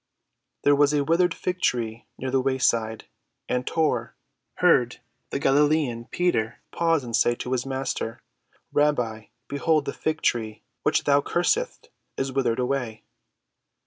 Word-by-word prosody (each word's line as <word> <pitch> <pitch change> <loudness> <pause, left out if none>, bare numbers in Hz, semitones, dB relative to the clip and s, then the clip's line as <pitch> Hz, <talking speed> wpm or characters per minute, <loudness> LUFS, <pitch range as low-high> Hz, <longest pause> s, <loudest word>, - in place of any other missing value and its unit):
There 145 0 +5
was 145 +1 +4
a 145 - +2
withered 170 +3 +2
fig‐tree 120 -11 -2
near 130 0 -4
the 135 0 +2
wayside, 115 -4 0 0.4
and 125 0 -1
Tor 125 -8 0 0.4
heard 130 -10 +3 0.3
the - - -2
Galilean, 140 -3 +2
Peter, 150 -9 0
pause 165 -4 +1
and 120 -2 -3
say 120 +1 +3
to 125 - -6
his 130 0 -1
Master, 130 -4 -3 0.5
"Rabbi, 125 -7 +1 0.2
behold 150 +1 +1
the - - -2
fig‐tree 115 -10 -1 0.2
which - - +2
thou 140 0 +4
cursedst 435 - -1 0.3
is 135 0 -1
withered 130 -4 0
away." 125 -3 -2
135 Hz, 130 wpm, -25 LUFS, 120-150 Hz, 0.5 s, There